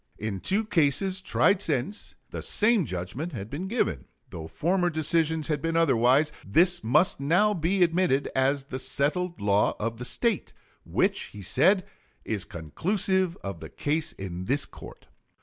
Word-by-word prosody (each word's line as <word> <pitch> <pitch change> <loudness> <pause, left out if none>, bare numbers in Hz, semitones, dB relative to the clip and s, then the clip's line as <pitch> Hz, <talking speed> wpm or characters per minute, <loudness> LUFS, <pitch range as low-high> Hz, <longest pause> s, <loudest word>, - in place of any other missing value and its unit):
In 105 -3 -4
two 205 - 0
cases 190 +1 +1
tried 195 0 +2
since, 155 - -3 0.2
the - - -5
same 215 -4 +2
judgment 105 - -5
had 105 -3 -7
been 165 +7 -4
given. 140 - -1 0.3
Though 80 -1 -7
former 175 - 0
decisions 160 0 0
had 150 -3 -1
been 165 +1 -1
otherwise, 140 -1 +3
this 170 - +3
must 125 +11 +3
now 180 +9 +3
be 180 +1 +1
admitted 165 -5 +1
as 135 +1 +1
"the 130 -1 -5
settled 170 +7 0
law 100 0 +2
of 115 +1 -3
the 125 - -5
State," 230 - -1 0.3
which, - - 0
he 105 -1 -11
said, 185 - +3 0.4
"is 105 -4 -2
conclusive 185 - -1
of 100 -4 -5
the - - -9
case 155 +2 -2
in 90 -1 -6
this 140 +6 +1
court." - - -13
155 Hz, 155 wpm, -27 LUFS, 115-185 Hz, 0.4 s, otherwise